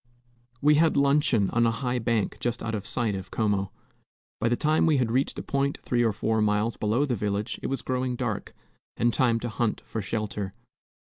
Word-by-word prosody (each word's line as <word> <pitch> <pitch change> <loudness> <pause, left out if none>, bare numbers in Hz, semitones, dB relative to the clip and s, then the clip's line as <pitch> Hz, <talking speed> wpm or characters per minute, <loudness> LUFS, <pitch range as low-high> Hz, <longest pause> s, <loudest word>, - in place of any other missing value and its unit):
We 150 +1 +6
had 165 -3 +3
luncheon 140 -7 +3
on 120 0 +3
a - - +4
high 125 +2 -1
bank 115 -3 0
just 120 0 -2
out 110 - -3
of 105 -1 -3
sight 115 -4 0
of 95 -1 -6
Como. 100 -3 0 0.7
By 115 - +1
the 120 - +2
time 155 +5 +2
we 155 -3 +4
had 120 -3 +1
reached 130 +3 0
a - - -4
point 140 0 0
three 120 -1 +1
or 115 - +3
four 110 +1 0
miles 105 +2 +1
below 110 +7 +1
the 130 -4 -1
village 105 0 -2
it - - -3
was 135 -4 -3
growing 130 0 -1
dark, 120 -4 -3 0.4
and 120 0 +2
time 120 -3 +2
to 120 - -3
hunt 115 0 -1
for 110 - -4
shelter. 105 -1 -3
115 Hz, 205 wpm, -27 LUFS, 105-130 Hz, 0.7 s, We